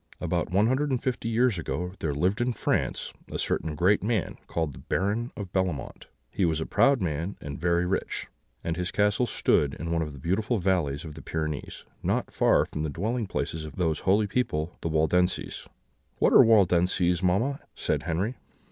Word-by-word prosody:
"About - - -1
one 100 +5 +3
hundred 130 +5 +1
and 130 -2 +1
fifty 120 -2 -2
years 115 -4 +2
ago, 90 +2 -3
there 80 - -1
lived 95 +9 +1
in 120 0 +1
France - - -1 0.2
a - - -3
certain 80 -1 -1
great 95 +7 +3
man, 110 -2 -1
called 80 -4 -2
the - - -11
Baron 105 +5 -1
of 95 -4 -6
Bellemont: 90 -7 -2 0.2
he - - -1
was 80 -3 +2
a 80 - -2
proud 135 -6 +3
man, 85 +3 -2
and 70 -1 -7
very 85 0 +2
rich; 95 +2 -2 0.4
and 85 - -1
his 90 0 -2
castle 105 +5 +2
stood 70 -9 +2
in 85 +1 -5
one 85 -1 +1
of 75 -2 -3
the - - -10
beautiful 105 - 0
valleys 85 -6 0
of 80 - -7
the 80 - -10
Pyrenees, 75 -3 -4 0.2
not - - -1
far - - +4
from 75 - -5
the 80 - -1
dwelling 110 - -2
places 80 -3 -3
of 75 -3 -8
those 80 -4 0
holy 100 +3 +3
people 90 -7 -1
the 85 - -2
Waldenses." 90 +4 +1 0.5
"What - - +3
are - - +9
Waldenses, 90 -4 +3
mamma?" 110 +11 +1 0.2
said - - -1
Henry. 90 +9 -2
90 Hz, 190 wpm, -27 LUFS, 80-105 Hz, 0.5 s, are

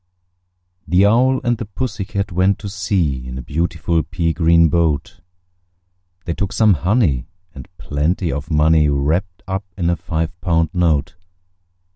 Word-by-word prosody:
The 90 +2 +4
Owl 130 +5 +3
and 120 -2 0
the 115 - -4
Pussy 105 0 -4
Cat 100 0 -3
went 95 +3 +2
to 100 - -7
sea 90 -9 -1
In 65 0 -6
a 65 - -6
beautiful 80 +3 -1
pea 85 0 -2
green 85 +1 +4
boat: 80 +2 -1 1.0
They 85 - -2
took 100 +3 -3
some 110 -3 +4
honey, 85 - +1 0.3
and 65 -3 -10
plenty 80 +4 -1
of 70 +3 -5
money 75 -1 +3
Wrapped 80 +7 -1
up 95 +1 -3
in 85 -2 +1
a - - +1
five 80 0 -3
pound 85 -3 +1
note. 80 -5 +1
85 Hz, 150 wpm, -19 LUFS, 75-95 Hz, 1.0 s, The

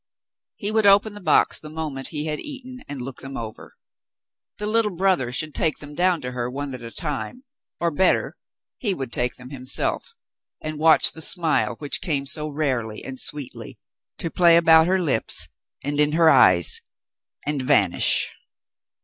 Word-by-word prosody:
He 205 0 -3
would 220 -1 +3
open 200 +2 +5
the 205 - -11
box - - +2
the 155 - -9
moment 150 -4 -4
he 150 -1 -4
had 150 -1 -3
eaten, 260 -3 -7
and 140 -3 -6
look 130 0 -8
them 135 0 -7
over. 110 -2 -8 0.8
The 210 - -5
little 220 0 +2
brother 180 -9 +1
should 155 +4 -3
take 160 -2 0
them 145 0 -10
down 175 +1 +1
to 125 - -5
her 125 -1 -3
one 140 +1 -5
at 125 - -8
a 115 - -7
time 165 - -4 0.2
— - - -69
or 170 -1 0
better 185 +5 +1 0.2
— - - -69
he 205 -6 0
would 135 -6 -6
take 120 0 -1
them 125 +1 -12
himself 130 -2 0 0.4
and 155 -1 -6
watch 160 0 +6
the 160 - -9
smile 160 -7 +1
which 145 -2 -4
came 145 -7 -1
so 150 +2 +2
rarely 130 -8 -2
and 130 -1 -6
sweetly 145 -3 -5 0.4
to 165 - -4
play 170 -2 +5
about 160 -1 +6
her 190 +1 +2
lips, 145 -10 +1 0.3
and 145 +1 -3
in 150 0 +2
her 165 0 +5
eyes, 85 -2 +5 0.6
and 145 -1 -1
vanish. 125 -10 +2
150 Hz, 180 wpm, -23 LUFS, 135-170 Hz, 0.8 s, watch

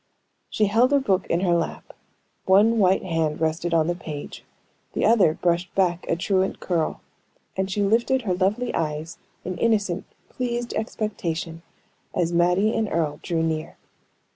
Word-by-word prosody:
She 215 - +1
held 230 +6 +3
a 285 - +5
book 195 -8 0
in 170 - 0
her 180 -2 +2
lap; 170 -1 -2 0.5
one 210 +4 +5
white 190 -1 +3
hand 165 -4 -1
rested 160 +2 -1
on 165 -2 +3
the 175 - 0
page, 155 -4 -8 0.5
the - - 0
other 200 -9 +4
brushed 175 0 -1
back 180 -2 +1
a - - +2
truant 190 +2 0
curl; 170 -4 -1 0.5
and 190 0 -1
she 205 +2 0
lifted 235 +5 +2
her 190 -5 0
lovely 205 +7 0
eyes 155 +1 -3 0.3
in 185 -1 -4
innocent, 205 -5 +1 0.2
pleased 240 -1 -3
expectation, 175 -7 -3 0.5
as 170 -1 0
Mattie 180 +5 +3
and 220 -2 0
Earle 155 -3 -1
drew 165 -2 -1
near. 160 -1 -3
180 Hz, 155 wpm, -24 LUFS, 165-210 Hz, 0.5 s, a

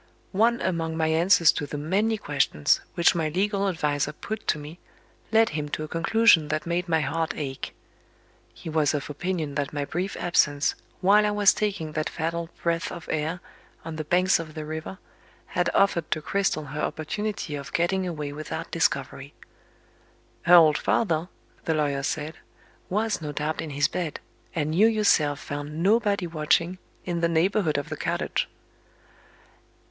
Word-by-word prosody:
One 230 +4 +2
among 165 -2 -1
my 160 -1 +1
answers 170 +1 +5
to 145 - -4
the 150 - -5
many 200 +9 +1
questions 140 - +1
which 170 - +4
my 165 -3 0
legal 200 +4 0
adviser 150 -5 0
put 215 +7 -6
to - - +2
me 150 +4 -9 0.5
led 225 0 +5
him 150 -1 -3
to 155 - -3
a - - -5
conclusion 170 0 +4
that 155 +1 -2
made 175 +1 -1
my 160 -1 +3
heart 160 +3 -1
ache. 135 -3 -5 0.8
He - - -12
was 155 -2 +1
of 145 0 -4
opinion 160 -1 -3
that 140 0 -2
my 145 -1 -2
brief 180 +6 -3
absence, 150 -4 +2 0.3
while 205 +3 +5
I 210 - +2
was 205 -1 +5
taking 195 -7 -2
that 155 0 -2
fatal 165 +1 -3
"breath 165 -1 0
of 170 -2 -8
air" 160 +3 -2 0.4
on 165 -1 -5
the 155 - -2
banks 180 +4 +3
of 160 -1 -7
the 155 -1 -5
river, 160 +4 -6 0.5
had - - 0
offered 195 -4 +2
to 155 - 0
Cristel 155 -2 -1
her 150 - -4
opportunity 200 +1 -3
of 140 -1 -6
getting 185 +2 0
away 150 -4 -4
without 155 +1 -6
discovery. - - -1 1.1
"Her 175 - +9
old 155 -3 +7
father," 170 -5 +1 0.4
the 160 - +1
lawyer 145 -2 0
said, 150 +3 -3 0.5
"was 215 0 0
no 150 -1 -4
doubt 150 +2 -2
in 160 - -5
his 145 0 +2
bed, 165 -1 -4 0.4
and 155 -1 -1
you 205 +7 +5
yourself 165 -10 +2
found 145 +3 -5
nobody 205 -2 +2
watching, 170 +2 +1 0.3
in 175 -2 -2
the 170 - +2
neighborhood 170 -1 +2
of 145 - -3
the - - -4
cottage." - - -1
165 Hz, 165 wpm, -26 LUFS, 150-185 Hz, 1.1 s, Her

